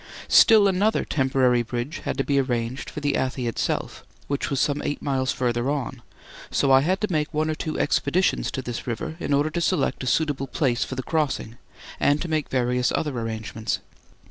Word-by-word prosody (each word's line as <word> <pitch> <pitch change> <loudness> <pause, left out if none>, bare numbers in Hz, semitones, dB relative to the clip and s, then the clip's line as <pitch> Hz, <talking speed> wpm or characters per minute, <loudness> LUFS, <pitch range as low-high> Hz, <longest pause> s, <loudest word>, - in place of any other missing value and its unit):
Still 215 -3 +7
another 200 +3 +2
temporary 130 -3 +2
bridge 120 +7 -4
had - - -2
to 135 - +1
be 140 0 +1
arranged 120 -1 -2
for 150 - -7
the 145 -1 +1
Athi 130 -1 -1
itself, 115 - -2 0.2
which 140 0 -2
was 140 -3 -1
some 145 -1 +1
eight 145 - -2
miles 130 -2 0
further 120 0 0
on, 135 -4 -3 0.5
so 135 - +2
I 135 0 +7
had 185 +6 +1
to 210 -2 -1
make 150 -2 0
one 155 0 0
or - - 0
two 155 0 -4
expeditions 165 +6 +1
to 130 - -3
this 120 0 -5
river 155 +7 -3
in - - -3
order 145 +2 +2
to 170 - -2
select 155 -7 0
a - - -4
suitable 145 -1 0
place 125 -2 0
for 130 - -5
the 130 - -3
crossing 145 -7 -1 0.4
and 145 +1 +3
to 175 - -4
make 155 -3 -1
various 125 -1 +1
other 150 -4 -1
arrangements. 110 -1 -3
135 Hz, 195 wpm, -24 LUFS, 125-155 Hz, 0.5 s, Still